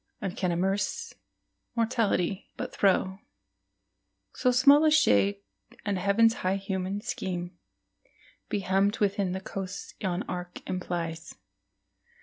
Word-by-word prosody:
And 195 -6 -4
can 180 -2 0
immense 190 +4 -1 0.6
Mortality 220 -5 0
but - - -5
throw 190 -1 +2 1.1
So 250 - +1
small 280 +4 +6
a 310 - +6
shade, 100 - +4 0.4
and 200 -3 0
Heaven's 210 +4 +4
high 185 +1 +1
human 195 0 -3
scheme 180 -6 -4 0.9
Be 205 - -1
hemmed 195 +2 +2
within 200 -2 +1
the 190 - -2
coasts 195 0 -6
yon 185 -1 -1
arc 180 0 -7
implies? 170 -2 -4
190 Hz, 115 wpm, -28 LUFS, 180-205 Hz, 1.1 s, small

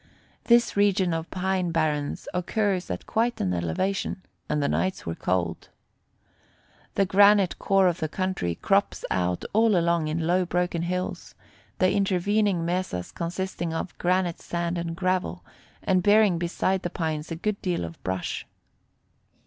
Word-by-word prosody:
This 235 0 +4
region 195 -3 +3
of 165 0 -3
pine 185 -1 -1
barrens 155 -3 -1
occurs 185 +1 0
at - - -4
quite 235 +1 0
an 90 - 0
elevation, 185 - -2 0.3
and 150 - +1
the 140 - +1
nights 185 0 -1
were 85 - -2
cold. 85 0 -2 1.3
The 195 - +3
granite 200 -1 +5
core 195 -1 +3
of 175 -2 0
the 155 - -2
country 185 - -2
crops - - +1
out 90 -1 0
all 220 -2 +4
along 170 -2 +2
in 160 +1 -1
low 180 +2 +3
broken 175 -1 -1
hills, 180 +2 -3 0.4
the 185 0 +3
intervening 200 -1 +1
mesas 175 - -2
consisting 170 -1 -3
of 165 - -4
granite 180 -1 +1
sand 170 0 -2
and 170 -1 -4
gravel, 185 0 -1 0.4
and 185 -1 +2
bearing 205 -2 +4
beside 185 +2 0
the 175 - -3
pines 160 -3 -3
a 165 - -3
good 205 +5 -2
deal 175 - -1
of 85 0 -10
brush. 95 -1 -3
180 Hz, 150 wpm, -26 LUFS, 165-190 Hz, 1.3 s, granite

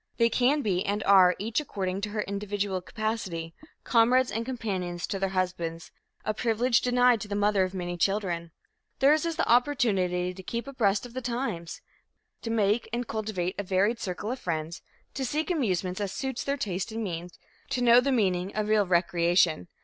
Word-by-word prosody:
They 230 -1 +4
can 270 +5 +2
be 190 -3 0
and 205 0 -1
are, 185 -2 +6
each 220 +5 -1
according 195 -8 -3
to 210 - -2
her 210 0 -2
individual 200 -1 -3
capacity, 190 -6 -4 0.3
comrades 250 +2 +3
and 225 - -2
companions 190 -8 -3
to 195 - -4
their 195 0 0
husbands 180 -3 -3 0.3
a 215 - 0
privilege 235 +2 +2
denied 245 -2 +3
to 210 - -5
the 205 - -3
mother 205 -1 +2
of 185 +1 -7
many 175 -1 -4
children. 175 -3 0 0.5
Theirs 300 +4 +4
is 330 - -2
the 325 - 0
opportunity 205 -9 +2
to 190 - -10
keep 235 +5 -4
abreast 220 -6 0
of 240 - -11
the 255 - -4
times, 235 -9 -4 0.6
to 230 - -5
make 220 0 +1
and 240 +1 -2
cultivate 205 -5 -2
a - - -1
varied 200 +5 +1
circle 200 +2 -4
of 255 - -4
friends, 160 -1 -4 0.3
to 270 - -3
seek 305 +7 -1
amusements 190 - -1
as 200 -2 -2
suits 265 -2 -3
their 280 0 -1
taste 195 -3 -3
and 225 +1 -3
means, 175 -2 -5 0.3
to 250 - -1
know 240 0 +7
the 275 +2 +1
meaning 190 -6 0
of 215 0 -1
real 210 -2 +3
recreation. 170 - +2
205 Hz, 185 wpm, -27 LUFS, 180-235 Hz, 0.6 s, know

